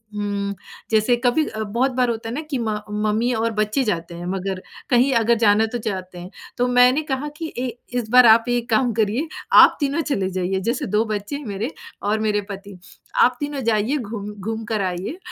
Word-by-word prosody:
उम, 200 -1 -2 0.4
जैसे 220 +3 +3
कभी 255 +6 +3
अ, 215 - -6
बहुत 235 +6 0
बार 250 -1 +1
होता 225 -1 -3
है - - -4
ना 300 - -2
कि 275 - -1
म 215 -2 -1
मम्मी 215 +3 0
और 230 0 0
बच्चे 215 +6 +1
जाते 170 -6 -3
हैं, 175 +1 -7
मगर, 190 0 -3 0.3
कहीं 250 +2 +4
अगर 235 +1 +3
जाना 210 +1 +5
तो - - 0
चाहते 185 -5 -5
हैं। 175 +1 -8 0.3
तो 245 - +2
मैंने 250 +3 +5
कहा 280 -1 -3
कि, 325 - -4
"ऐ 255 0 -1 0.3
इस 225 -3 -6
बार 250 0 +8
आप 225 +1 +6
एक 240 0 -1
काम 240 +2 +2
करिए, 220 +9 +1 0.3
आप - - +8
तीनों 285 +2 0
चले 205 -12 -1
जाइए।" 185 +1 0
जैसे 245 - -1
2 220 - +4
बच्चे 205 +7 -4
हैं 285 - -7
मेरे, 215 +6 -4 0.3
और 210 +2 +1
मेरे 210 -1 +1
पति। 200 0 -9 0.5
"आप 250 0 +3
तीनों 290 -1 -3
जाइए, 220 +7 +1
घूम 210 -4 -5
घूम 220 +3 -4
कर 215 - 0
आइए, 180 - -5
220 Hz, 210 wpm, -22 LUFS, 205-250 Hz, 0.5 s, बार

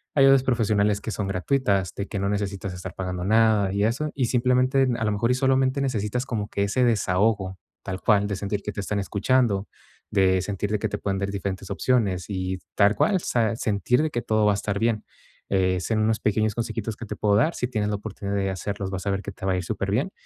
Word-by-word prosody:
Ayudas 135 -2 +6
profesionales 105 -5 +2
que 110 - -4
son 100 0 -3
gratuitas, 100 -1 0
de 100 - -4
que 100 - -4
no 100 - 0
necesitas 100 -2 -3
estar 90 -1 -7
pagando 90 -1 -4
nada 110 -2 +3
y 100 +1 +1
eso, 145 +7 -1
y 130 - 0
simplemente 125 +2 +2
a 110 - 0
lo 105 - +1
mejor, 115 +4 +1
y - - +3
solamente 130 0 +2
necesitas 125 -1 -1
como 105 -3 -3
que 100 - -1
ese 110 +6 +1
desahogo, 100 -3 +1 0.3
tal 95 -1 -4
cual, 100 -2 +3
de 100 - -2
sentir 100 +1 -3
que 105 - -4
te 100 - -7
están 100 +1 -2
escuchando, 105 0 +1 0.4
de 95 -2 +3
sentir 100 +2 -3
de 105 - +2
que 110 - 0
te - - -3
puedan 100 -1 -1
dar 100 - -2
diferentes 100 -1 -4
opciones 100 -6 0
y, 95 -1 -3 0.2
tal 100 0 +4
cual, 205 - +2
o - - -2
sea, 115 -7 0
sentir 115 +5 +1
de 155 - -1
que 120 - -2
todo 110 -1 +1
va 105 - +5
a - - 0
estar 100 0 -2
bien. 115 -1 +1 0.5
Eh, 95 -1 +2
son 110 +2 0
unos 110 0 +1
pequeños 110 0 +1
consejitos 115 -2 -3
que 120 - -7
te 105 - -4
puedo 105 -1 +2
dar, 155 +11 +2
si 125 - -1
tienes 105 -4 -1
la 105 - 0
oportunidad 100 -1 -5
de 95 -1 0
hacerlos, 100 +1 -4
vas 95 0 -5
a - - +2
ver 100 0 -1
que 100 - -5
te 95 - -8
va 95 - +2
a 90 - 0
ir 90 - -3
superbien 105 - -1
105 Hz, 235 wpm, -25 LUFS, 100-115 Hz, 0.5 s, Ayudas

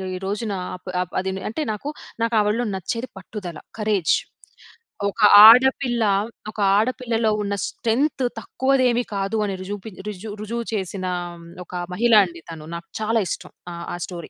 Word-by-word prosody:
ఈ - - -3
రోజున 205 +2 -2 0.5
అప్ 180 -1 -5
అదినే 190 0 -3
అంటే 230 - -4
నాకు, 215 +7 -5 0.3
నాకు 230 +1 0
ఆవిడలో 210 +3 +1
నచ్చేది 230 +6 -3
పట్టుదల. 185 -3 -7 0.2
కరేజ్. 210 -6 +1 1.0
ఒక 210 - -7 0.3
ఆడపిల్ల, 245 0 +5 0.5
ఒక 220 - -11 0.2
ఆడపిల్లలో 230 -1 +1
ఉన్న 200 0 -1
స్ట్రెంగ్త్ 260 +5 0 0.2
తక్కువది 260 +4 +1
ఏమి 240 +1 +1
కాదు, 195 +3 -1
అని 195 -2 -2
రుజువుపి 205 +3 -6 0.2
రుజువు 210 +1 -6
రుజువు 235 +2 -4
చేసిన 190 -2 -3 0.3
ఆహ్, - - -10
హ్మ్, 170 - -13 0.2
ఒక - - -16 0.2
మహిళ 235 +4 +2
అండి 170 -2 -10
తను. 155 -2 -9
నాకు 170 0 -8
చాలా 225 +1 +2
ఇష్టం - - -5 0.2
ఆహ్, 170 0 -7
ఆ - - -2
స్టోరీ. 175 -2 -8
210 Hz, 155 wpm, -22 LUFS, 190-235 Hz, 1.0 s, ఆడపిల్ల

